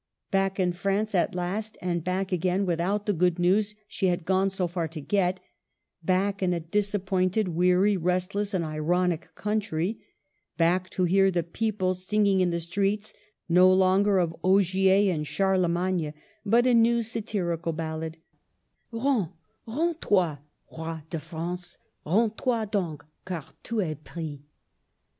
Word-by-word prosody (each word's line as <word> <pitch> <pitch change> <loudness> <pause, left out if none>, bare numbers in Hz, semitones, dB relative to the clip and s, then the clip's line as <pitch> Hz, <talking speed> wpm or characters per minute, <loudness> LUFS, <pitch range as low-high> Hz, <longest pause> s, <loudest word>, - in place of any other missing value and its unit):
Back 195 -1 +1
in 180 -1 +2
France 200 +4 -1
at 180 -1 +1
last, 200 +5 -3
and 175 -2 -2
back 185 +2 -1
again 185 +2 +1
with 170 -3 0
out 200 +4 0
the 205 - +1
good 180 0 +2
news 200 +4 +2
she 195 - -1
had 175 -2 0
gone 190 +1 +2
so 190 -2 -1
far 170 -1 -2
to 160 0 -8
get; 185 +3 0 0.6
back 195 +3 +1
in 180 -1 +2
a 170 - -1
disappointed, 190 +2 0
weary, 180 +4 +3
restless, 185 +4 -1
and 170 -3 0
ironic 165 +2 0
country; 210 -2 -1 0.6
back 180 +2 +2
to 185 - -1
hear 195 +2 +4
the 175 -2 0
people 185 +1 -1
singing 195 +1 +1
in 180 - +3
the 170 0 -1
streets, 200 +5 -1 0.3
no 180 +2 +6
longer 190 +2 +4
of 170 -2 +1
Ogier 190 +1 +4
and 150 -2 -3
Charle 190 0 +2
magne, 170 -2 -1 0.3
but 230 +3 +3
a 250 - +4
new 235 0 +4
satirical 200 -7 -2
ballad, 160 0 -4 0.4
— - - -48
"Rens, 230 -4 +1 0.4
rens 320 +8 0
toy, 175 -8 +2 0.4
Roi 160 0 -5
de 165 - -2
France, 175 +3 -6 0.3
Rens 215 +7 +3
toy 235 -3 0
done, 190 -7 -2 0.3
car 170 -5 -4 0.2
tu 230 -2 -2
es 155 -4 -3
pris 155 -4 -6
185 Hz, 150 wpm, -27 LUFS, 170-200 Hz, 0.6 s, no